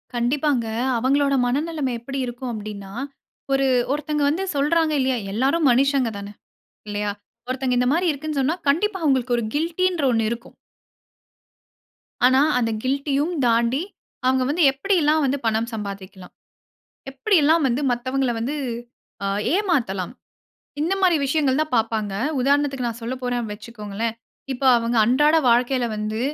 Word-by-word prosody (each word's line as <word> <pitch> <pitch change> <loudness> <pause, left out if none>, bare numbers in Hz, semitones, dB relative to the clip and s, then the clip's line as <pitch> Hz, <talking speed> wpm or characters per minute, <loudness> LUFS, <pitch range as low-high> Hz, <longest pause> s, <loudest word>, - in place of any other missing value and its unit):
கண்டிப்பாங்க. 250 0 +1 0.3
அவங்களோட 275 +3 +2
மனநிலைமை 285 0 -1
எப்படி 270 +3 -5
இருக்கும் 245 +1 -5
அப்டின்னா, 205 -2 -7 0.6
ஒரு 270 0 +2 0.2
ஒருத்தவங்க 295 0 -1
வந்து 350 +6 -1
சொல்றாங்க 310 +3 +2
இல்லையா? 260 -1 +1 0.2
எல்லாரும் 275 +7 +2
மனிஷங்க 265 -1 +2
தான 200 +1 -8 0.6
இல்லையா? 205 0 -2 0.4
ஒருத்தங்க 255 -1 0
இந்த 250 - +2
மாரி 355 +2 +1
இருக்குன்னு 300 0 -4
சொன்னா 305 +6 +1
கண்டிப்பா 380 +7 +1
அவங்களுக்கு 260 -4 +2
ஒரு 235 - -1
கில்டின்ற 340 +2 0
ஒண்ணு 225 -1 +1
இருக்கும். 235 +1 -7 1.7
ஆனா, 260 +2 +5 0.2
அந்த 230 -2 0
கில்டியும் 280 +4 0
தாண்டி, 235 +5 +2 0.4
அவுங்க 260 0 +3
வந்து 330 +3 +2
எப்பிடி 390 +9 0
எல்லாம் 305 0 +3
வந்து 275 +1 0
பணம் 225 +1 0
சம்பாதிக்கலாம். 195 -3 -7 0.8
எப்பிடி 360 +9 +1
எல்லாம் 315 +1 +4
வந்து 250 +4 -1
மத்தவங்கல 255 +1 -1
வந்து 275 +6 -2 0.7
ஆ - - 0 0.3
ஏமாத்தலாம். 255 - 0 0.7
இந்த 335 +5 0
மாதிரி 360 -4 +4
விஷயங்கள் 275 -1 +1
தான் 310 -3 -2
பாப்பாங்க. 220 -3 0 0.3
உதாரணத்துக்கு 275 -1 +1
நான் 230 0 -6
சொல்ல 235 +3 -3
போறேன்னு 245 -3 -2
வச்சிக்கோங்களேன், 220 0 -5 0.4
இப்ப 260 +1 -8 0.2
அவங்க 235 +1 -1
அன்றாட 295 +6 +4
வாழ்க்கையில 245 +1 +2
வந்து 215 +1 -3
260 Hz, 135 wpm, -22 LUFS, 235-295 Hz, 1.7 s, ஆனா